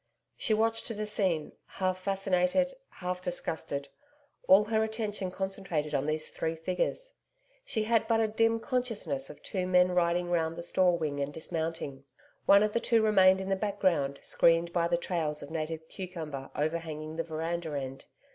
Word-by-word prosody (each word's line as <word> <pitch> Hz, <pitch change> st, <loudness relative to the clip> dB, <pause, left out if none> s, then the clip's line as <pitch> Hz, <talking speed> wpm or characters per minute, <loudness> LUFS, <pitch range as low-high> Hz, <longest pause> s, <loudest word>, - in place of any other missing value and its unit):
She 220 Hz, -, +1 dB
watched 225 Hz, +1 st, 0 dB
the 215 Hz, -2 st, -3 dB
scene, 185 Hz, -7 st, +1 dB, 0.2 s
half 185 Hz, -1 st, -1 dB
fascinated, 195 Hz, +6 st, +1 dB, 0.2 s
half 180 Hz, 0 st, -4 dB
disgusted, 160 Hz, -5 st, -1 dB, 0.6 s
all 195 Hz, +2 st, +8 dB
her 220 Hz, +1 st, +1 dB
attention 215 Hz, -3 st, -2 dB
concentrated 185 Hz, -5 st, -3 dB
on 135 Hz, +2 st, 0 dB
these 155 Hz, 0 st, -1 dB
three 160 Hz, 0 st, -2 dB
figures. 185 Hz, -, -2 dB, 0.5 s
She 225 Hz, -, -1 dB
had 225 Hz, 0 st, +2 dB
but 225 Hz, -1 st, +3 dB
a 220 Hz, -, +3 dB
dim 225 Hz, +1 st, +2 dB
consciousness 225 Hz, -, -2 dB
of -, -, -12 dB
two 185 Hz, -2 st, -2 dB
men 180 Hz, 0 st, +4 dB
riding 175 Hz, 0 st, +1 dB
round 165 Hz, -1 st, +1 dB
the 170 Hz, -, -5 dB
store 175 Hz, 0 st, +3 dB
wing 150 Hz, -3 st, -2 dB
and 140 Hz, 0 st, -2 dB
dismounting. 160 Hz, -3 st, -4 dB, 0.4 s
One 200 Hz, +1 st, +7 dB
of 210 Hz, 0 st, 0 dB
the 235 Hz, -, +2 dB
two 230 Hz, -1 st, +3 dB
remained 190 Hz, -3 st, +5 dB
in 190 Hz, -, -4 dB
the 195 Hz, -, +2 dB
background 185 Hz, -9 st, 0 dB
screened 170 Hz, +1 st, +3 dB
by 170 Hz, -1 st, +2 dB
the 170 Hz, 0 st, +1 dB
trails 160 Hz, -4 st, -2 dB
of 145 Hz, -, -10 dB
native 160 Hz, 0 st, -4 dB
cucumber 160 Hz, -8 st, -6 dB
overhanging 155 Hz, 0 st, -3 dB
the 165 Hz, -, 0 dB
veranda 160 Hz, -1 st, -3 dB
end. 135 Hz, 0 st, -7 dB
180 Hz, 165 wpm, -30 LUFS, 160-205 Hz, 0.6 s, all